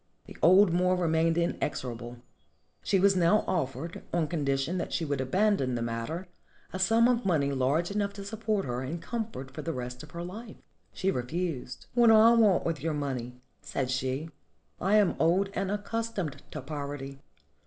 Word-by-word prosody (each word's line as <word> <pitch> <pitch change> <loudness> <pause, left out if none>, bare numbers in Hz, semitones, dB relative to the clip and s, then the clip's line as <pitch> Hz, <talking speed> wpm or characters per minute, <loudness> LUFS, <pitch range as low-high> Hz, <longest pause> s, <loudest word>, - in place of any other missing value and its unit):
The - - -12
old 185 +1 +6
Moor 180 +1 +3
remained 165 -1 +2
inexorable. 125 -8 -2 0.6
She 195 - +2
was 195 +1 +4
now 180 +4 +4
offered, 160 -1 -3
on 170 -3 +1
condition 145 +2 -1
that - - -4
she 165 - -1
would 140 -2 -2
aban 195 +11 +2
don 130 -2 -1
the 120 - -2
matter, 120 +11 -4 0.5
a 185 - -3
sum 225 +5 +4
of 245 -1 +1
money 150 -7 +1
large 140 +7 +1
enough 200 0 -1
to 200 -1 -8
support 215 -1 -1
her 125 -1 -3
in 135 +6 -4
comfort 190 - -5
for - - -6
the 165 - -3
rest 125 -1 -6
of 150 - -11
her 170 - -7
hfe. 215 +5 -8 0.4
She 190 +1 0
refused. 130 -1 -4
"What 240 -1 +5
do 225 - +8
I 225 +2 +7
want 215 -5 +4
with 165 -4 -2
your 160 0 -1
money?" 130 -4 -3 0.3
said 130 -2 -3
she. 130 +5 -2 0.5
"I 195 +3 +2
am 205 -4 +4
old 185 +5 +2
and 195 -1 -2
accustomed 205 - -3
to 150 - -6
poverty. 140 -1 -6
170 Hz, 180 wpm, -29 LUFS, 135-195 Hz, 0.6 s, do